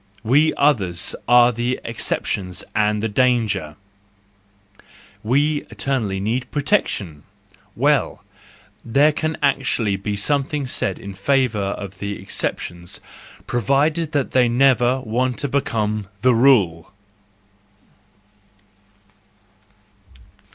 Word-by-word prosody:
We 145 +7 +3
others 100 -12 +2
are 120 0 +6
the 120 +2 -2
exceptions 95 -5 -3
and 105 0 +1
the - - +1
danger 110 - 0 1.5
,—we 145 +6 0
eternally 115 -8 -2
need 115 +6 -2
pro¬ 145 -2 -2
tection 100 - 0 0.5
!—Well, 145 0 +1 0.6
there 140 +6 +3
can 155 +1 -3
actually 125 -7 +1
be 105 +1 -3
something 140 +5 -1
said 125 - -2
in 100 -3 -8
favour 105 -1 0
of 100 -1 -9
the 100 0 -4
exceptions 85 -2 -4 0.5
provided 145 +7 0
that 145 -2 0
they 125 -2 +3
never 130 0 +3
want 125 +2 -1
to 145 - -2
become 110 -6 -1 0.2
the 130 -1 +5
rule. 105 -10 +3
120 Hz, 100 wpm, -21 LUFS, 100-135 Hz, 1.5 s, are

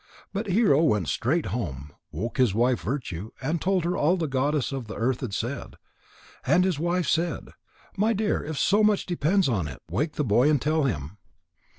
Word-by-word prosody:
But 205 +2 -3
Hero 190 -7 +4
went 105 - +2
straight 150 - 0
home, 75 - -4 0.2
woke 105 - -4
his 120 -6 +3
wife 120 +1 +2
Virtue, 110 - -4
and 155 +5 -2
told 185 -2 +1
her 175 +1 0
all 170 +6 +2
that 170 - -1
the 145 - -6
Goddess 140 +1 0
of 135 -4 -5
the 110 - -7
Earth 120 +3 -1
had 125 -6 -4
said. 120 +6 -4 0.7
And 180 - +3
his 185 -6 0
wife 175 +1 0
said: 165 +1 -1 0.5
"My 210 +3 +2
dear, 215 -1 0
if 155 -1 -5
so 205 +8 +3
much 210 -1 +3
depends 175 +2 +1
on 100 - 0
it, 65 - -8
wake 150 - -1
the 150 - -1
boy 120 +4 +3
and 150 -2 +3
tell 155 +2 +1
him." 80 - -3
140 Hz, 200 wpm, -26 LUFS, 115-175 Hz, 0.7 s, Hero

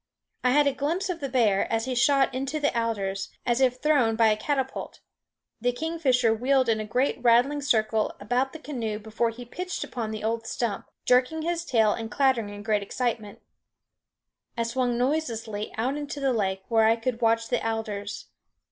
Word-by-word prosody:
I 250 - +4
had 290 +3 +4
a 280 - +2
glimpse 335 +8 -1
of 345 - -5
the 275 - -4
bear 225 -7 +2
as 225 0 0
he 260 - -2
shot 270 +2 +3
into 270 +4 -2
the 290 -3 0
alders, 200 -4 -1 0.2
as 240 +2 +1
if 255 -1 +3
thrown 255 -7 +3
by 225 0 +4
a 215 - +3
catapult; 265 +4 -3 0.6
the 245 +1 +2
kingfisher 260 -5 +1
wheeled 255 +2 +2
in 220 -1 +2
a 215 - -3
great 250 +4 0
rattling 250 +5 +4
circle 220 -5 +1
about 245 +6 0
the - - -8
canoe 240 -9 -4
before 220 +2 -1
he 240 +2 -9
pitched 360 +9 -4
upon 230 -4 -4
the 215 -1 -5
old 225 +1 -2
stump, 230 -4 -3 0.2
jerking 255 +6 +3
his 340 0 -1
tail 220 -7 +3
and 225 -1 -5
clattering 255 -4 +1
in 205 0 -8
great 215 -1 +1
excitement. 220 -1 -3 1.1
I 230 - +1
swung 245 +1 0
noiselessly 235 -6 -2
out 255 +6 0
into 290 0 -5
the 270 -2 +1
lake, 190 -3 -1
where 225 -1 +3
I 225 +1 +5
could 235 +1 -3
watch 230 0 +2
the - - 0
alders. 215 -2 -3
240 Hz, 185 wpm, -26 LUFS, 220-270 Hz, 1.1 s, I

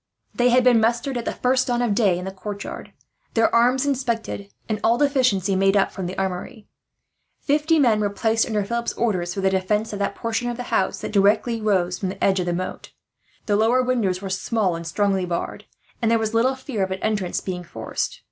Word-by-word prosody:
They 245 0 +3
had 250 +1 +4
been 245 -2 +5
mustered 235 +4 0
at 235 -1 -3
the - - -1
first 255 +1 +1
dawn 240 -1 0
of 230 -4 +1
day 200 -5 +2
in 180 - -5
the 190 - -4
courtyard, 200 +1 -7 0.4
their 225 0 +3
arms 250 +4 +3
inspected, 235 -7 -2 0.2
and 215 -2 -2
all 230 +1 +3
deficiencies 250 -9 +2
made 195 +1 +3
up 195 - +2
from 190 -3 -5
the 185 - -6
armoury. 195 +4 -4 0.7
Fifty 305 +3 +2
men 235 -7 +4
were 205 -1 +1
placed 225 +2 +1
under 210 -3 -1
Philip's 235 +2 -2
orders, 180 -7 -1
for 195 - -2
the 190 0 +2
defence 210 +4 0
of 205 - -4
that 200 - -1
portion 230 +1 -2
of 240 - -4
the 245 - -4
house - - +1
that - - -4
rose 200 - +6
directly 220 +3 +2
from 185 -2 0
the 190 - -6
edge 195 -1 +3
of 180 - -2
the - - +1
moat. 185 +1 -5 0.5
The 205 - +1
lower 230 +4 +3
windows 210 -7 0
were 195 - -4
small 190 -1 0
and 165 0 -6
strongly 195 +2 +1
barred, 170 -1 -4 0.4
and 230 - +2
there 230 - +4
was 220 0 -2
little 250 +4 +2
fear 260 -5 -5
of 190 - -2
an 190 0 -5
entrance 210 -5 -1
being 180 -2 -5
forced. - - -4
215 Hz, 220 wpm, -23 LUFS, 190-240 Hz, 0.7 s, rose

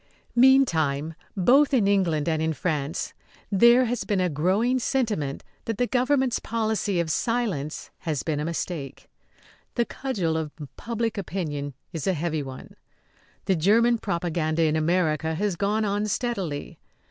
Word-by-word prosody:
Meantime, 165 - +4 0.2
both 270 +9 +5
in 215 -6 +3
England 175 -7 +2
and 160 -1 +1
in 160 0 0
France, 150 -2 -2 0.4
there 235 +5 +6
has 245 0 -2
been 205 -2 0
a 180 -1 +2
growing 195 - +1
sentiment 215 - -1 0.2
that 225 -3 -2
the 245 - +2
government's 255 0 +1
policy 220 -4 -1
of 165 -2 0
silence 205 - -2
has 155 -5 -2
been 155 -3 -1
a - - -1
mistake. 160 -4 -4 0.7
The 235 - +2
cudgel 190 -14 -2
of 155 -2 -4 0.2
public 230 -2 -2
opinion 150 -7 -4 0.2
is 160 -1 -4
a 190 - +3
heavy 160 -1 -1
one. 130 -2 -9 0.7
The 190 - +2
German 225 +8 +3
propaganda 170 -4 -1
in 155 -1 +2
America 160 -1 +1
has 200 +1 -1
gone 210 +4 0
on 205 +1 0
steadily. 195 - -3
185 Hz, 145 wpm, -25 LUFS, 155-230 Hz, 0.7 s, there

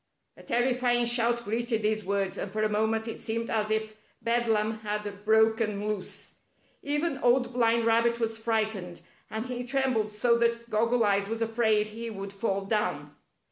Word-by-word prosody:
A - - -14
terrifying 245 0 +1
shout 235 0 +1
greeted 225 +1 -1
these 215 0 0
words, 195 0 -1
and 195 - -5
for 215 +1 -1
a 215 - +2
moment 220 +1 0
it 225 - -5
seemed 230 0 -3
as 215 -1 0
if 220 0 -1 0.2
bedlam 225 -2 +1
had 210 -1 -2 0.2
brol|en 220 -1 +2
loose. 210 -3 -5 0.5
Even 295 0 -1
Old 250 0 +2
Blind 230 -1 +2
Rabbit 230 +1 +3
was 225 -1 -1
frightened, 215 -6 -2 0.3
and 220 +2 -4
he 250 -1 -4
trembled 250 -4 0
so 235 +3 +2
that 235 0 0
Goggle 230 +2 +2
Eyes 200 -1 +2
was 225 0 -1
afraid 220 -2 +2
he 230 +2 -6
would 195 -2 -7
fall 195 -1 -2
down. 210 +1 -1
225 Hz, 165 wpm, -28 LUFS, 215-235 Hz, 0.5 s, Rabbit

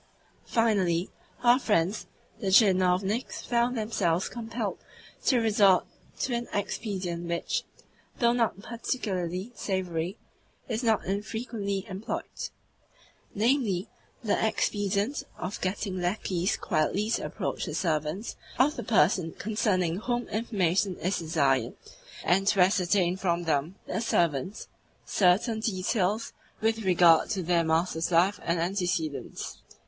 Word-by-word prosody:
Finally, 195 -7 +1 0.3
our 245 +1 +6
friends 205 -4 +1 0.3
the 205 - -3
tchinovniks 190 +2 +3
found 240 +1 +1
themselves 190 -6 0
compelled 230 -2 -4 0.4
to 260 - +3
resort 205 -5 +4 0.3
to 255 - -1
an 240 0 -2
expedient 190 -4 -3
which, 170 0 -1 0.5
though 235 -1 +3
not 230 -4 +1
particularly 200 -5 -3
savoury, 185 -3 -2 0.5
is 225 -1 -2
not 225 -4 +2
infrequently 205 0 -3
employed 195 +2 -5 0.9
namely, 215 -4 +1 0.4
the 210 - +1
expedient 205 +3 0 0.2
of 180 +3 -5
getting 185 0 -2
lacqueys 180 -1 0
quietly 190 +7 0
to - - 0
approach - - -3
the - - -4
servants 160 +4 -1 0.2
of 290 +5 +3
the - - -3
person 175 -4 +3
concerning 185 -5 0
whom 240 +3 -2
information 195 -4 0
is 185 +3 -1
desired, 145 -5 +1 0.5
and 195 +3 +2
to 200 - +3
ascertain 180 -1 +3
from 175 -2 0
them 160 +2 0
(the - - -2
servants) 170 - 0 0.4
certain 210 +5 +3
details 205 0 0 0.3
with 225 +1 +1
regard 175 -3 +5
to 195 -4 -1
their 170 0 +2
master's 160 +1 +1
life 180 +4 +3
and 170 0 0
antecedents. 175 -4 -2
195 Hz, 115 wpm, -28 LUFS, 175-220 Hz, 0.9 s, our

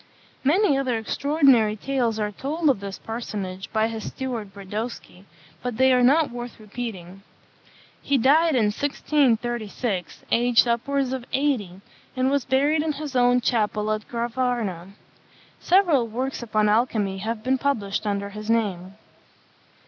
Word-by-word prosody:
Many 310 +3 +3
other 255 -4 0
extraordinary 260 -2 +3
tales 240 -1 -1
are 210 -1 -1
told 295 +7 0
of 250 - -3
this 200 -1 -6
personage 200 -5 -6
by 220 0 +2
his 225 -1 -5
steward 240 -6 -5
Brodowski, 200 0 -7 0.4
but 245 -3 -4
they 260 0 +5
are 250 - +4
not 285 +4 +4
worth 240 0 -7
repeating. 200 -4 -7 0.8
He 280 - +1
died 300 +5 +4
in 210 -4 +2
1636, 240 - -1
aged 240 +1 +4
upwards 260 +3 0
of 255 -2 -4
eighty, 235 -10 -1 0.4
and 260 +1 +2
was 280 -3 0
buried 285 +4 +2
in 310 0 -1
his 290 -1 -6
own 245 0 +4
chapel 215 -3 0
at 215 0 -3
Gravarna. 235 -6 -2 0.7
Several 345 -10 +3
works 255 +5 -3
upon 215 -2 +1
alchymy 210 -3 +1
have 220 +2 -4
been 260 +1 +1
published 215 -8 -1
under 200 0 -2
his 210 +1 -8
name. 195 -5 -1
235 Hz, 140 wpm, -24 LUFS, 210-265 Hz, 0.8 s, they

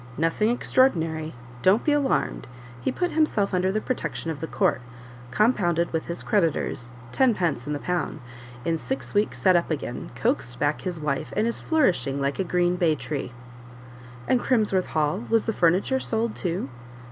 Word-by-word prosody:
"Nothing 165 +7 +1
extraordinary 160 - +1 0.3
don't 195 +5 +4
be 300 - +2
alarmed; 290 -2 0 0.3
he - - 0
put 355 -1 -1
himself 240 -11 +1
under 185 +1 +2
the 215 - 0
protection 165 - -3
of 150 - -6
the 160 - -4
court, 125 - +1 0.5
compounded 175 - +2
with 160 - -1
his 170 - -4
creditors 165 - 0 0.2
tenpence 175 - +1
in 150 - -1
the - - -1
pound; 175 0 -2 0.5
in 165 -1 0
six 265 - -4
weeks 205 +1 +1
set 185 -2 +4
up 170 - +2
again, 145 -6 -4
coaxed 120 0 -1
back 145 +3 0
his 180 -3 -4
wife, 150 -3 -2
and 215 - +3
is 235 - -1
flourishing 175 - +1
like 140 +3 -1
a - - +2
green 180 0 +1
bay 165 -3 +3
tree." 135 0 -4 1.0
"And 255 - +3
Crimsworth 210 -7 +2
Hall 155 +7 0
was 225 -1 +3
the 225 - 0
furniture 185 +10 +2
sold 225 -2 -1
too?" 175 -4 -2
175 Hz, 170 wpm, -25 LUFS, 155-215 Hz, 1.0 s, don't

